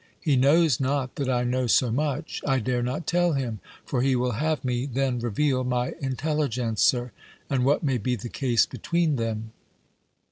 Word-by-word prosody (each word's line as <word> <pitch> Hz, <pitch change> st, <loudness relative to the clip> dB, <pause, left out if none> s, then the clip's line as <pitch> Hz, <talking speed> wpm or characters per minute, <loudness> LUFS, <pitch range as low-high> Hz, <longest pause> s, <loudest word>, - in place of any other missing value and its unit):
He 150 Hz, -5 st, +1 dB
knows 145 Hz, +2 st, +4 dB
not 135 Hz, -1 st, -1 dB
that 140 Hz, -2 st, -1 dB
I 125 Hz, -1 st, +1 dB
know 125 Hz, +1 st, 0 dB
so 120 Hz, +1 st, +3 dB
much. 145 Hz, +4 st, -2 dB
I 135 Hz, -2 st, +3 dB
dare 125 Hz, 0 st, -1 dB
not 125 Hz, +7 st, -3 dB
tell 175 Hz, 0 st, +2 dB
him. 125 Hz, -6 st, -2 dB, 0.3 s
For 125 Hz, -, -1 dB
he 130 Hz, 0 st, +2 dB
will 125 Hz, 0 st, 0 dB
have 150 Hz, +5 st, -1 dB
me 125 Hz, +1 st, -1 dB
then 130 Hz, -1 st, -1 dB
reveal 130 Hz, +3 st, 0 dB
my 125 Hz, 0 st, -1 dB
intelligencer: 130 Hz, -4 st, 0 dB, 0.4 s
and 130 Hz, -2 st, +1 dB
what 140 Hz, +5 st, +2 dB
may 135 Hz, -4 st, +1 dB
be 125 Hz, +4 st, -1 dB
the 120 Hz, +1 st, -7 dB
case 120 Hz, -1 st, +2 dB
between 170 Hz, -4 st, -1 dB
them? 110 Hz, -1 st, -3 dB
130 Hz, 175 wpm, -25 LUFS, 120-145 Hz, 0.4 s, knows